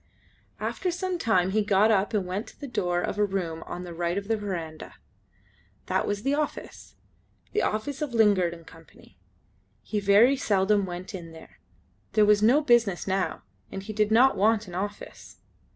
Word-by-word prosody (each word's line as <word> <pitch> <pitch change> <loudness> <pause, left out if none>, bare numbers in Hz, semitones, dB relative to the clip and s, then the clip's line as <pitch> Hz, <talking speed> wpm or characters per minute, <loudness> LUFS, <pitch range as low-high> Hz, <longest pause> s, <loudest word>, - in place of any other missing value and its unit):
After 370 - -2
some 360 0 -3
time 190 - +2
he 215 +2 +2
got 205 +1 +3
up 200 -1 +2
and 205 -4 0
went 185 +4 -4
to - - -15
the 285 - -6
door 175 -7 -1
of 200 - -3
a - - +4
room 180 -5 -2
on 180 - -6
the 175 -1 -8
right 170 +2 -2
of 200 0 -4
the 225 - +3
verandah. 170 -7 -6 0.9
That - - -1
was 205 0 -2
the 275 - +1
office. 300 0 -4 0.6
The 420 - +1
office 270 +7 -2
of 295 -3 -2
Lingard 205 -6 +3
and 165 -1 -11
Co. 165 0 -15 1.0
He 210 - -2
very 205 +7 +5
seldom 200 -2 +1
went 180 +1 -7
in 170 -3 -8
there. 160 - -15 0.5
There 215 -1 +5
was 210 0 +4
no 245 +8 +5
business 235 - +2
now, 190 -1 -2 0.3
and 195 - -6
he 215 +2 -6
did 210 0 +1
not 250 +5 +5
want 215 +1 +2
an 175 - -10
office. 205 +3 -7
205 Hz, 185 wpm, -26 LUFS, 180-225 Hz, 1.0 s, very